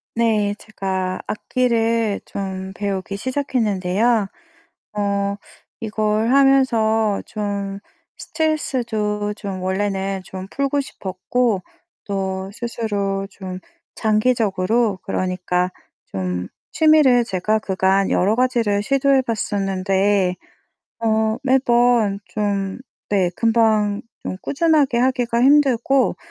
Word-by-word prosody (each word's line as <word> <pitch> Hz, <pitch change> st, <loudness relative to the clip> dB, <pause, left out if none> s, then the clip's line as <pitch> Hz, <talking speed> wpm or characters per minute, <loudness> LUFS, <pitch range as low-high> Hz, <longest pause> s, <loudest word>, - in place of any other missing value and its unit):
네, 215 Hz, -3 st, +2 dB
제가 190 Hz, -3 st, -3 dB
악기를 230 Hz, -2 st, 0 dB
좀 190 Hz, -1 st, -5 dB
배우기 200 Hz, -1 st, -3 dB
시작했는데요. 220 Hz, -4 st, 0 dB, 0.7 s
어 200 Hz, -1 st, 0 dB, 0.4 s
이걸 215 Hz, 0 st, 0 dB
하면서 230 Hz, -6 st, +3 dB
좀 200 Hz, -2 st, -4 dB, 0.4 s
스트레스도 235 Hz, -10 st, -1 dB
좀 195 Hz, -3 st, -6 dB
원래는 195 Hz, 0 st, -1 dB
좀 190 Hz, 0 st, -8 dB
풀고 280 Hz, +1 st, 0 dB
싶었고 205 Hz, -1 st, -2 dB, 0.4 s
또 190 Hz, -1 st, -3 dB
스스로 205 Hz, -4 st, -2 dB
좀 185 Hz, -2 st, -7 dB, 0.3 s
장기적으로 215 Hz, -2 st, +1 dB
그러니까 180 Hz, -1 st, -1 dB, 0.4 s
좀 90 Hz, -1 st, -3 dB, 0.2 s
취미를 310 Hz, -6 st, +5 dB
제가 215 Hz, +1 st, 0 dB
그간 190 Hz, -1 st, +1 dB
여러 200 Hz, +4 st, +2 dB
가지를 235 Hz, -5 st, +1 dB
시도해 275 Hz, +2 st, +3 dB
봤었는데 195 Hz, -4 st, 0 dB, 0.7 s
어 220 Hz, 0 st, +2 dB
매번 240 Hz, -5 st, +3 dB
좀 200 Hz, -2 st, -2 dB, 0.3 s
네 185 Hz, -4 st, +2 dB
금방 220 Hz, -3 st, +2 dB, 0.2 s
좀 185 Hz, -, -5 dB
꾸준하게 290 Hz, -4 st, +2 dB
하기가 245 Hz, -2 st, +1 dB
힘들고 270 Hz, -1 st, +4 dB
210 Hz, 205 characters per minute, -21 LUFS, 195-240 Hz, 0.7 s, 취미를